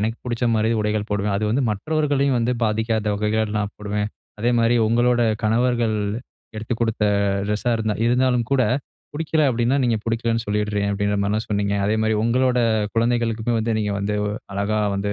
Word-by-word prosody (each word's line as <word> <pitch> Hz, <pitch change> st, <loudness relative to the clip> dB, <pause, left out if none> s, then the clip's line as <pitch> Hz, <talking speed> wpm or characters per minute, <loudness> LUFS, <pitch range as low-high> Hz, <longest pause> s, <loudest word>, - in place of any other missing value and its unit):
எனக்கு 110 Hz, +2 st, -1 dB
பிடிச்ச 120 Hz, 0 st, -2 dB
மாதிரி 110 Hz, +1 st, +1 dB
உடைகள் 105 Hz, 0 st, -1 dB
போடுவேன் 100 Hz, 0 st, 0 dB
அது 105 Hz, -, -1 dB
வந்து 130 Hz, +5 st, +1 dB
மற்றவர்களையும் 140 Hz, +3 st, 0 dB
வந்து 120 Hz, +2 st, 0 dB
பாதிக்காத 110 Hz, 0 st, 0 dB
வகைகள் 105 Hz, +1 st, 0 dB
நான் 105 Hz, 0 st, -3 dB
போடுவேன்." 105 Hz, 0 st, -2 dB, 0.3 s
அதே 120 Hz, +3 st, +2 dB
மாரி 115 Hz, +1 st, +3 dB
உங்களோட 120 Hz, +1 st, +2 dB, 0.2 s
கணவர்கள் 115 Hz, 0 st, +1 dB, 0.6 s
எடுத்துக் 110 Hz, +2 st, -3 dB
குடுத்த 115 Hz, -2 st, 0 dB, 0.4 s
ட்ரெஸ்ஸா 105 Hz, +4 st, -1 dB
இருந்தா 110 Hz, -2 st, -1 dB
இருந்தாலும் 125 Hz, -1 st, +2 dB
கூட, 130 Hz, -2 st, +4 dB, 0.5 s
பிடிக்கல 155 Hz, -1 st, +1 dB
அப்படின்னா 120 Hz, +2 st, +1 dB
நீங்க 115 Hz, -2 st, +2 dB
பிடிக்கலைன்னு 115 Hz, 0 st, -1 dB
சொல்லிடுறேன் 105 Hz, -1 st, -1 dB
அப்படின்ற 100 Hz, 0 st, 0 dB
மாதிரி 105 Hz, +2 st, 0 dB
தான் 110 Hz, -, -3 dB
சொன்னீங்க. 100 Hz, -1 st, 0 dB
அதே 105 Hz, +2 st, +1 dB
மாரி 110 Hz, 0 st, +1 dB
உங்களோட 125 Hz, +1 st, +2 dB, 0.4 s
குழந்தைகளுக்குமே 115 Hz, 0 st, 0 dB
வந்து 115 Hz, +1 st, 0 dB
நீங்க 105 Hz, -1 st, -1 dB
வந்து 105 Hz, +1 st, -1 dB, 0.4 s
அழகா 100 Hz, +2 st, 0 dB, 0.2 s
வந்து 100 Hz, +1 st, -1 dB
110 Hz, 165 wpm, -22 LUFS, 105-120 Hz, 0.6 s, கூட